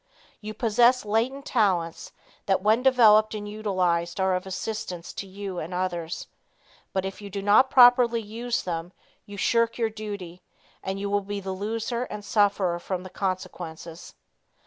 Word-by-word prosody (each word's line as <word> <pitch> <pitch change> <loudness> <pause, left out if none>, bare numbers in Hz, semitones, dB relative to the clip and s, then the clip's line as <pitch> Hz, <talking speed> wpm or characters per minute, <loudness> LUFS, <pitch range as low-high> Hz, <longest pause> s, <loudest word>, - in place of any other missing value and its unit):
You 215 0 -7
possess 235 +2 +3
latent 235 +6 -1
talents, 185 -6 0 0.4
that 190 -1 +1
when 215 +3 +3
developed 220 -5 +5
and 205 -1 -5
utilized 185 -4 -1
are 190 0 +2
of 185 +1 -2
assistance 185 -3 -5
to 195 - -6
you 190 -1 -6
and 170 +3 -5
others. 175 -2 -3 0.7
But 190 0 -1
if 195 +2 -6
you 200 - -8
do 200 0 -5
not 210 +6 +5
properly 245 -2 +6
use 230 +3 -3
them, 170 0 -4 0.3
you 205 0 -9
shirk 230 +2 +1
your 225 -2 0
duty, 200 -5 -7 0.4
and 195 +1 -4
you 200 - -3
will 205 0 +1
be 200 +1 -5
the 190 -1 -5
loser 225 +5 -3
and 210 -3 -8
suffer 200 -5 +2
from 180 +1 -4
the 185 - -10
consequences. 175 -3 -5
200 Hz, 160 wpm, -26 LUFS, 185-220 Hz, 0.7 s, properly